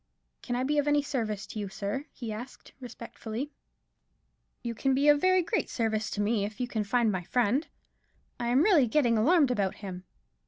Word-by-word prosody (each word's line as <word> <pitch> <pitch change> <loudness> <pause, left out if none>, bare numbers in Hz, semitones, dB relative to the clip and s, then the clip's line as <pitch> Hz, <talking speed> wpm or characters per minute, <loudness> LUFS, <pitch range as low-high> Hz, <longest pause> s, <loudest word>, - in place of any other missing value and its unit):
"Can 245 - -3
I 250 - 0
be 295 +3 +1
of 290 - 0
any 290 0 +3
service 225 -8 -2
to 215 - -7
you, 200 -2 -4
sir?" 205 +8 -4
he 230 -4 -6
asked, 240 +4 -9
respectfully. 240 +1 -6 1.1
"You 235 -1 -2
can 265 +3 +1
be 280 +2 +2
of 290 -1 +5
very 370 -1 +4
great 435 +6 -1
service 220 -2 -1
to 205 - -2
me, 205 0 +1
if 205 0 -5
you 250 - -1
can 220 -3 -2
find 230 +1 +2
my 185 -2 -2
friend; 245 - +1 0.7
I 240 - -2
am 255 +5 +4
really 340 - +5
getting 240 -2 +3
alarmed 285 +5 +4
about 200 -6 0
him." 185 -2 -8
240 Hz, 195 wpm, -29 LUFS, 215-280 Hz, 1.1 s, of